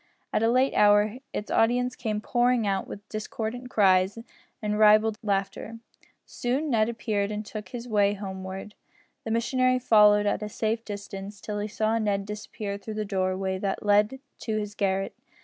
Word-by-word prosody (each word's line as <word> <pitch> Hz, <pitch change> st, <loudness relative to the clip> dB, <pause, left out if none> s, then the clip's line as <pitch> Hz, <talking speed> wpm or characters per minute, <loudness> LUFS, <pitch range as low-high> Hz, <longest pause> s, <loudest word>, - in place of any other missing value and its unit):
At -, -, +2 dB
a 225 Hz, -, +3 dB
late 255 Hz, +3 st, +3 dB
hour 210 Hz, +3 st, +4 dB
its 210 Hz, -, -5 dB
audience 245 Hz, +2 st, +2 dB
came 215 Hz, -4 st, -3 dB
pouring 245 Hz, 0 st, +2 dB
out 195 Hz, -1 st, -1 dB
with 205 Hz, -, -9 dB
discordant 225 Hz, +3 st, -5 dB
cries 190 Hz, -2 st, +3 dB, 0.4 s
and 210 Hz, 0 st, -2 dB
ribald 215 Hz, +1 st, +5 dB
laughter. 200 Hz, +1 st, -2 dB, 0.5 s
Soon 270 Hz, +5 st, -2 dB
Ned 220 Hz, -1 st, +3 dB
appeared 210 Hz, -3 st, -1 dB
and 210 Hz, 0 st, -4 dB
took 210 Hz, -2 st, -7 dB
his 245 Hz, -1 st, -7 dB
way 205 Hz, -2 st, +2 dB
homeward. 190 Hz, 0 st, -6 dB, 0.5 s
The -, -, -3 dB
missionary 255 Hz, +3 st, +2 dB
followed 210 Hz, -4 st, +5 dB
at 205 Hz, -, 0 dB
a 210 Hz, -, -4 dB
safe 225 Hz, +2 st, -1 dB
distance 205 Hz, -1 st, -7 dB
till 210 Hz, +1 st, -4 dB
he 205 Hz, -, -2 dB
saw 220 Hz, +1 st, 0 dB
Ned 200 Hz, -2 st, 0 dB
disappear 210 Hz, -1 st, -5 dB
through 215 Hz, +1 st, -7 dB
the 215 Hz, 0 st, -2 dB
doorway 190 Hz, -1 st, -1 dB
that 195 Hz, +1 st, -3 dB
led 210 Hz, +5 st, +3 dB, 0.2 s
to 220 Hz, -2 st, -2 dB
his 210 Hz, -1 st, -3 dB
garret. 195 Hz, -2 st, -1 dB
210 Hz, 165 wpm, -27 LUFS, 200-225 Hz, 0.5 s, ribald